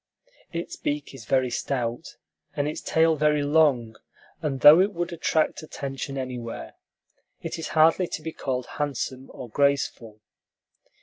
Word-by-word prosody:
Its 170 0 -5
beak 145 -1 -3
is 125 -5 -11
very 130 0 +1
stout, 120 -1 -3 0.4
and 145 0 0
its 150 - -4
tail 160 0 +3
very 150 -1 +2
long; 145 -7 +3 0.5
and 135 -4 -2
though 150 +5 +10
it 200 +2 +1
would 175 0 -3
attract 160 -1 0
attention 140 -2 -5
anywhere, 120 - -5 0.7
it - - -4
is 165 - -4
hardly 165 +3 +5
to 155 - -6
be 160 - -4
called 130 -2 -3
handsome 135 -2 -3
or 125 - -8
graceful. 125 -4 0
140 Hz, 140 wpm, -25 LUFS, 130-155 Hz, 0.7 s, though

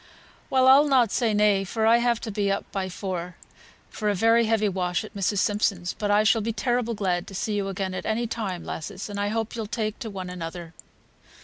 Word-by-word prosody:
"Well, 260 -1 +4
I'll 275 +3 +7
not 250 -6 +3
say 235 -3 +1
nay, 210 -2 +3
for 220 +3 -1
I've 235 +1 +4
to 220 - -5
be 200 -1 0
up 195 - -2
by 190 -1 -2
four 180 -2 -5 0.6
for 210 - -2
a 205 - +1
very 225 +4 +4
heavy 220 -1 +2
wash 180 0 -1
at 215 - -10
Mrs. 200 0 -1
Simpson's; 195 -3 0
but 205 - -3
I 205 +1 +4
shall 220 +1 +3
be 225 +2 -1
terrible 240 -1 -1
glad 180 -3 -1
to 195 - -9
see 215 +3 -2
you 200 -1 -1
again 195 -1 -3
at 185 - -5
any 225 +2 0
time, 210 -6 -4
lasses; 185 +6 -6
and 200 - -4
I 205 - 0
hope 225 +2 -2
you'll 225 -2 -4
take 215 -1 -3
to 235 -4 -5
one 185 -3 -6
another." 170 -1 -7
210 Hz, 220 wpm, -25 LUFS, 190-225 Hz, 0.6 s, I'll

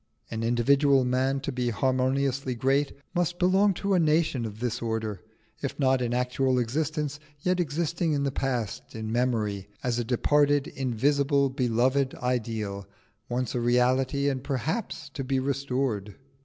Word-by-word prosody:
An 110 -1 -3
individual 135 +3 +3
man, 130 +2 +1
to 140 - -3
be 125 -1 -1
harmoniously 130 +2 0
great, 135 +4 +1 0.2
must 175 -1 0
belong 190 +2 +3
to 200 +2 -1
a 185 - +4
nation 155 -6 +2
of 105 0 -9
this 120 -2 -2
order, 110 -4 -2 0.4
if 140 - -3
not 130 -2 +3
in 120 -1 -1
actual 125 +1 +1
existence 150 +4 -1 0.2
yet 180 +2 +1
existing 165 +1 0
in 140 -1 0
the 140 - 0
past, 125 -8 -3
in 110 0 -4
memory, 110 -5 0 0.2
as 120 -1 0
a - - 0
departed, 145 +4 +2
invisible, 140 +2 +1
beloved 130 +1 +1
ideal, 110 -5 -2 0.4
once 125 0 -1
a 120 - -1
reality, 130 +3 +2
and 130 -2 -1
perhaps 145 - -3
to 140 - -5
be 135 +1 0
restored. 130 -6 -2
130 Hz, 150 wpm, -27 LUFS, 120-140 Hz, 0.4 s, a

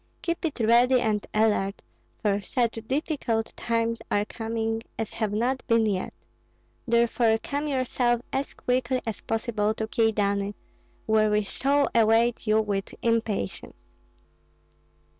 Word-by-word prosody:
Keep 335 0 -2
it 305 -5 -3
ready 240 +3 +5
and 215 -3 -1
alert, 210 -2 +1 0.4
for 205 -1 +1
such 230 +1 -1
difficult 260 -5 -1
times 230 0 -1
are 205 0 +1
coming 225 0 -3 0.2
as 225 - -3
have 220 -3 -2
not 245 +5 0
been 230 -1 +4
yet; 195 -3 -1 0.8
therefore 235 -1 +3
come 285 +6 -3
yourself 250 -3 +1
as 270 +1 -2
quickly 255 +1 0
as 225 -2 -4
possible 220 -1 -1
to 220 - -2
Kyedani, 205 -3 +1 0.5
where 215 -1 +3
we 210 0 +2
shall 280 +7 +1
await 230 +1 +3
you 215 +1 +4
with 200 -2 -3
impatience. 225 - -2
225 Hz, 125 wpm, -26 LUFS, 215-245 Hz, 0.8 s, ready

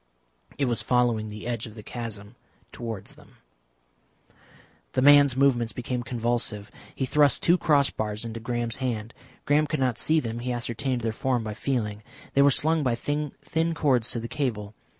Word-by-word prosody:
It 140 - +1
was 120 -2 0
following 120 -3 +1
the 105 +1 -8
edge 120 -1 -3
of 110 - -12
the 105 - -10
chasm 110 -2 -7 0.4
towards 115 -4 -6
them. - - -19 1.6
The - - +1
man's 145 -2 +7
movements 125 -4 +2
became 125 0 -3
convulsive. 115 -4 -2 0.2
He 135 - -1
thrust 145 0 +3
two 170 - +5
cross 145 -5 +3
bars 105 +1 -3
into 115 0 -5
Graham's 120 0 -3
hand. 120 -4 -3 0.3
Graham 150 +1 +3
could 155 -2 -2
not 125 -3 0
see 160 0 +3
them, 115 -4 -4
he 125 +1 -3
ascertained 120 +1 -2
their 115 -1 -1
form 125 0 0
by 105 -1 -4
feeling. 110 -3 -2 0.3
They 140 - +4
were 140 - +7
slung 160 +4 +3
by 125 -4 +1
thin 145 +3 -2 0.4
cords 130 -7 +2
to 120 - 0
the 115 - -5
cable. 115 -8 -3
120 Hz, 170 wpm, -26 LUFS, 115-140 Hz, 1.6 s, man's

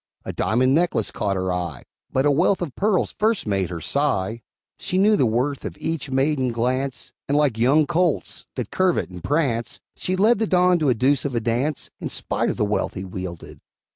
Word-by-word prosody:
A - - -4
diamond 130 +4 +2
necklace 165 - +1
caught 100 -2 -1
her 95 -1 -1
eye, 85 -7 -4 0.3
But 130 +2 +1
a 145 - +5
wreath 180 +6 +2
of 150 -7 -5
pearls 205 -2 +1
first 220 0 +1
made 95 -4 0
her 85 -2 -5
sigh. 115 - -1 0.4
She 185 - -2
knew 210 +3 +5
the 130 - +3
worth 130 +5 -1
of - - -6
each 160 -3 -3
maiden 135 -1 +1
glance, 125 +2 -2
And, 145 - +2
like 140 -7 +2
young 140 +6 +4
colts, 170 0 -1
that 125 -5 -4
curvet 185 - +1
and 90 -2 -9
prance, 135 -7 -1 0.2
She 185 - -2
led 215 +4 +4
the 220 - +1
Don 180 -2 +3
a 135 -5 +3
deuce 130 +4 +2
of 140 -3 -3
a - - +2
dance, 120 +6 -2
In - - -4
spite - - -1
of - - -3
the - - +1
wealth 100 -1 -1
he 95 - -5
wielded. 90 -3 -7
135 Hz, 200 wpm, -23 LUFS, 110-165 Hz, 0.4 s, a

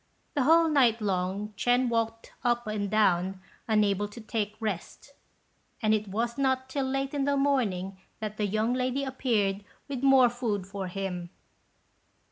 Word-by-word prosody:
The 275 -3 +1
whole 330 +2 +6
night 255 -7 +4
long 195 0 -1
Ch'ên 245 +4 +2
walked 230 -1 -2
up 240 -1 +1
and 210 -2 -2
down 190 -3 +2 0.3
unable 205 -2 +2
to 205 +3 -11
take 215 -1 -3
rest; 215 +5 -5 0.7
and 215 -2 +2
it 215 -1 0
was 235 +6 -2
not 260 -1 +1
till 270 0 -1
late 270 +1 -2
in 280 -2 0
the 285 0 +1
morning 200 -10 0 0.2
that 215 -1 -5
the 210 - 0
young 215 +4 0
lady 255 +2 0
appeared 220 -7 0 0.2
with 275 -3 -4
more 265 -3 +6
food 225 -6 -2
for 195 0 -5
him. 180 -2 -4
225 Hz, 155 wpm, -28 LUFS, 200-260 Hz, 0.7 s, whole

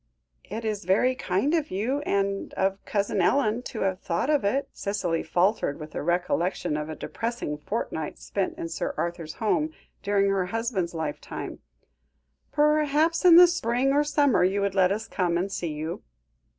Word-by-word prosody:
"It 220 +4 -6
is 210 -2 -2
very 210 +8 +3
kind 255 - 0
of 315 -3 +1
you, 225 +9 -1
and 200 0 -1
of 195 +1 0
Cousin 200 -1 0
Ellen 230 +3 +2
to 225 - -5
have 190 -1 0
thought 180 - -1
of 295 -6 +2
it," 260 +8 0
Cicely 195 -5 -1
faltered 175 -2 +1
with 155 0 -9
a - - -3
recollection 175 0 0
of 150 +1 -3
a 155 - -5
depressing 230 -8 -4
fortnight 160 -4 -4
spent 195 -2 -3
in 165 - -4
Sir 165 - -3
Arthur's 170 -2 -3
home, 300 +8 0 0.3
during 200 0 +2
her 190 -2 0
husband's 200 -5 -2
lifetime; 155 -2 -5 0.9
"perhaps 300 +2 +2
in 345 -2 +9
the 355 +1 +11
spring 270 -6 +1
or 290 +1 +4
summer 290 -7 +3
you 190 +2 +2
would 200 -1 0
let 190 -1 +4
us 215 +2 -2
come 175 -3 0
and 190 +3 -2
see 170 -4 -3
you." 155 +3 -4
200 Hz, 170 wpm, -26 LUFS, 175-250 Hz, 0.9 s, the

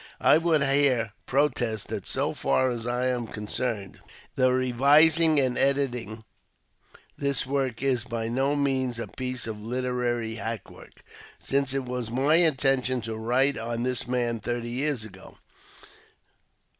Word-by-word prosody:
I 155 - +5
would 165 -3 +2
here 135 -6 +2
protest 125 -6 0
that - - -5
so - - -1
far 130 -1 +1
as 120 -1 -5
I 125 +1 -1
am 125 -2 -1
concerned, 105 -1 -4 0.4
the 130 0 +3
revising 145 +6 +4
and 130 -2 +1
editing 125 -6 0 1.0
this 140 -2 0
work 135 -2 -2
is 130 -4 +1
by 115 -1 -4
no 135 +5 0
means 130 -4 0
a 115 - -4
piece 130 -1 -4
of 110 -2 -6
literary 120 -1 -2
hack 115 -2 -5
work, - - -16 0.3
since 140 -1 -1
it 135 -1 -2
was 125 -2 -4
my 135 +7 +2
intention 135 -6 +2
to 110 0 -5
write 125 +5 +1
on 115 +1 -3
this 125 -1 -2
man 120 -2 -1
thirty 120 +1 -4
years 130 -2 -1
ago. 110 - -14
125 Hz, 145 wpm, -26 LUFS, 115-135 Hz, 1.0 s, I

